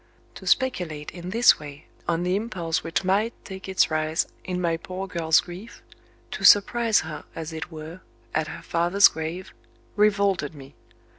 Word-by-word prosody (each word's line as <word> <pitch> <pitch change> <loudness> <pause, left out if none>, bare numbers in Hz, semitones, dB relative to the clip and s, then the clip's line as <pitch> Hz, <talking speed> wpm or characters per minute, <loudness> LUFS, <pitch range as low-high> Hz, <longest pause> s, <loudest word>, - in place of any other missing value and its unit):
To - - -11
speculate 180 - 0
in 175 0 -8
this 230 -1 +5
way 145 0 -10 0.2
on 170 0 0
the 180 +1 +1
impulse 180 -6 -2
which 165 +3 -1
might 200 +5 +1
take 190 -1 -8
its 190 -3 +2
rise 155 +1 0 0.2
in 180 -1 -3
my 170 -2 +1
poor 185 +3 -6
girl's 165 -4 +2
grief 185 +6 -11 0.5
to - - -6
surprise 225 +2 +5
her, 155 -2 -7
as 165 0 -6
it 160 +2 -6
were, 160 +3 -9 0.3
at 160 0 0
her - - -8
father's 175 +4 +4
grave 160 +3 -6 0.4
revolted 200 -7 +2
me. 135 -1 -12
175 Hz, 160 wpm, -25 LUFS, 160-195 Hz, 0.5 s, this